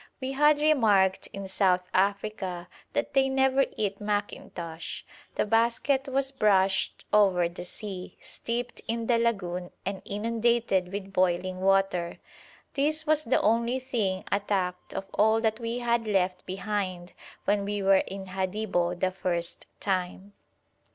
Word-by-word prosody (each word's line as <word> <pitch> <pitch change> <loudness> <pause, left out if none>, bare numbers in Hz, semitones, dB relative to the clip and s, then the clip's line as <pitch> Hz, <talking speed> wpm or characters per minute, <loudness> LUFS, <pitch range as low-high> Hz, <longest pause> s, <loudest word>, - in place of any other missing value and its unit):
We 260 0 -3
had 295 +2 +4
remarked 215 -11 +3
in 195 0 -6
South 185 -1 +2
Africa 195 -2 -1 0.3
that - - -1
they 270 0 +4
never 265 0 +3
eat 200 -1 -2
mackintosh. 180 -5 -4 0.3
The - - +1
basket 235 +5 +2
was 270 0 0
brushed 195 -6 +2
over 190 -5 +4
the 175 +1 -8
sea, 185 0 -7
steeped 235 +1 -4
in 230 0 -1
the 235 0 +3
lagoon, 180 -6 -1 0.2
and 195 0 -3
inundated 225 -3 +1
with 195 -1 -6
boiling 185 0 +1
water. 195 -3 +2 0.6
This 305 +2 0
was 310 0 +3
the 245 - +2
only 235 +3 +2
thing 220 -8 -1
attacked 195 -3 -1
of 195 - -3
all 220 +2 +4
that 220 -1 0
we 230 0 -3
had 235 -2 0
left 185 -3 0
behind 185 -2 -3 0.3
when 205 0 +2
we 205 0 -2
were 195 0 +6
in 195 0 -6
Hadibo 185 -2 -1
the 185 +1 +1
first 175 -2 -3
time. 190 +1 -2
200 Hz, 140 wpm, -28 LUFS, 185-235 Hz, 0.6 s, were